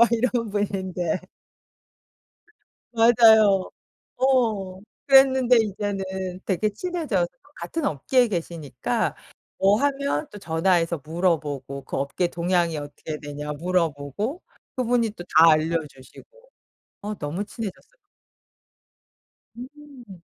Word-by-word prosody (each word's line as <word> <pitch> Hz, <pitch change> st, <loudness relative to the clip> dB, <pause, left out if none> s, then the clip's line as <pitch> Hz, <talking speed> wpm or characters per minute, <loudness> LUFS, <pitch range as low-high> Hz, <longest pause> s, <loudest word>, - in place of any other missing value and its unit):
막 235 Hz, -, +7 dB
이런 235 Hz, -1 st, 0 dB
분인데. 190 Hz, -4 st, -2 dB, 1.7 s
맞아요. 220 Hz, -4 st, +5 dB, 0.5 s
어. 220 Hz, -8 st, +1 dB, 0.3 s
그랬는데 265 Hz, -2 st, +6 dB
이제는 205 Hz, -2 st, -2 dB, 0.4 s
되게 195 Hz, +2 st, 0 dB
친해져서 290 Hz, -, -2 dB, 0.3 s
같은 330 Hz, -2 st, -4 dB
업계에 245 Hz, -, +2 dB
계시니까 165 Hz, -, -3 dB, 0.4 s
뭐 200 Hz, +3 st, +3 dB
하면 280 Hz, +1 st, 0 dB
또 205 Hz, -, -10 dB
전화해서 170 Hz, -1 st, +1 dB
물어보고 150 Hz, -5 st, -2 dB
그 -, -, -5 dB
업계 140 Hz, +6 st, -1 dB
동향이 170 Hz, -2 st, 0 dB
어떻게 145 Hz, +1 st, -7 dB
되냐 145 Hz, 0 st, -6 dB
물어보고 170 Hz, -, -2 dB, 0.3 s
그분이 245 Hz, -2 st, +1 dB
또 175 Hz, -4 st, -10 dB
다 165 Hz, +1 st, +9 dB
알려주시고. 155 Hz, -, -4 dB, 0.6 s
어 210 Hz, +1 st, -4 dB
너무 155 Hz, +7 st, -4 dB
친해졌어요. 225 Hz, -, -8 dB, 1.6 s
음. 255 Hz, -, -12 dB
195 Hz, 230 characters per minute, -24 LUFS, 165-240 Hz, 1.7 s, 다